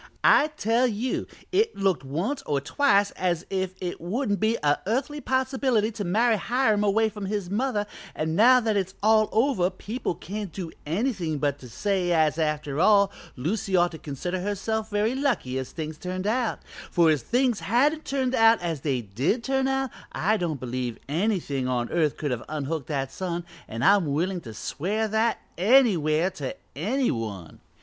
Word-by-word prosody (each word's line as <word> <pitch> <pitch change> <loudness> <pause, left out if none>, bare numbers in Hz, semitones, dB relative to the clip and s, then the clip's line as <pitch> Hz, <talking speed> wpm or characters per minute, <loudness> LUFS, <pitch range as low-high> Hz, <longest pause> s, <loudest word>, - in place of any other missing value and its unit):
I 300 - +6
tell 230 +4 +2
you 240 +3 -2 0.2
it 425 +4 +2
looked 190 -8 +1
once 180 - -2
or 145 -1 +1
twice 200 - +2
as 175 -1 -1
if 190 -1 -2
it 180 -1 -5
wouldn't 205 +3 -1
be 220 +3 +2
a 145 0 +3
earthly 280 +6 -1
possibility 260 -4 +1
to 215 -2 -5
marry 220 +5 +2
Hiram 225 -2 +1
away 215 +2 +3
from 205 -2 -6
his 200 -3 -3
mother, 215 -1 0 0.3
and 160 +1 -1
now 250 +6 +7
that 220 -2 0
it's 190 -1 -1
all 215 0 +4
over 225 -6 +2
people 200 +1 -4
can't 200 +2 -6
do 170 -1 -6 0.2
anything 175 - -1
but 145 -1 -1
say 180 - -1
as 160 -1 +2
after 150 -2 -1
all 200 +1 +5 0.2
Lucy 190 - -1
ought 175 -1 +4
to 160 - -9
consider 175 +6 -4
herself 215 +3 -2
very 210 +3 +1
lucky 255 - 0
as 130 - -6
things 155 -1 -6
turned 185 +1 -4
out, 235 +2 0 0.3
for 170 -2 +4
if 150 -4 +1
things 245 - +1
hadn't 285 +9 +2
turned 265 -2 -1
out 225 -1 +5
as 165 -5 -3
they 135 -4 0
did 125 - -1
turn 265 +1 +1
out 270 -2 0 0.2
I 215 +3 +1
don't 170 -8 -2
believe 125 -2 -3
anything 155 - -1
on 120 -2 -1
earth 155 -4 +1
could 145 -3 -2
have 120 -1 -3
unhooked 155 -1 -3
that 135 -3 -2
son, 175 +1 -4 0.2
and 115 +3 -3
I'm 200 -4 +5
willin' 175 +5 -1
to 115 -6 -9
swear 205 - -2
that 220 +2 +1 0.2
anywhere 185 - +4
to 140 -6 -5 0.2
any 240 - 0
one. 105 -8 -5
195 Hz, 175 wpm, -26 LUFS, 155-225 Hz, 0.3 s, now